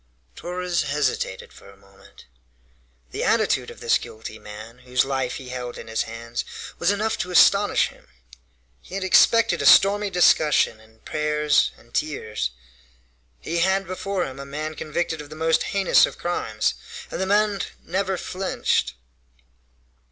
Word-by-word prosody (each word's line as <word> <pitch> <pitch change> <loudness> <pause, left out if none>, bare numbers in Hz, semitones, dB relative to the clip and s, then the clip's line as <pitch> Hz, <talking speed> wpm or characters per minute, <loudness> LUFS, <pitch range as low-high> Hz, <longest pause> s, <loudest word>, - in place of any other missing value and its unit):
Torres 180 0 -2
hesitated 145 -9 -2
for - - -15
a 100 - -17
moment. 100 0 -19 0.9
The - - -3
attitude - - +1
of - - -12
this - - +3
guilty 110 0 -9
man, 110 +3 -11
whose 125 0 0
life 135 -2 -2
he 130 -2 -8
held 125 -1 -6
in - - -9
his 110 0 -1
hands, 115 +1 -5 0.4
was 175 - +2
enough 215 +2 0
to 180 - -3
astonish 200 +3 +4
him. - - -20 0.7
He 185 - -10
had 195 - -2
expected 230 +4 +4
a - - -1
stormy 205 +1 +6
discussion 155 - +3
and 110 0 -23
prayers 150 -1 +1
and 120 - -22
tears. 110 - -2 0.9
He 170 +1 -2
had 190 +2 +2
before 185 +1 -3
him 135 0 -8
a - - -5
man 155 +3 -5
convicted 160 +1 -3
of 145 - -12
the 155 - -9
most 160 +1 +1
heinous 195 -2 +4
of - - -10
crimes, 110 - -1 0.4
and - - -4
the 190 - -1
man 205 -1 +2 0.2
never 190 +1 -1
flinched. 185 - -1
155 Hz, 150 wpm, -23 LUFS, 125-190 Hz, 0.9 s, stormy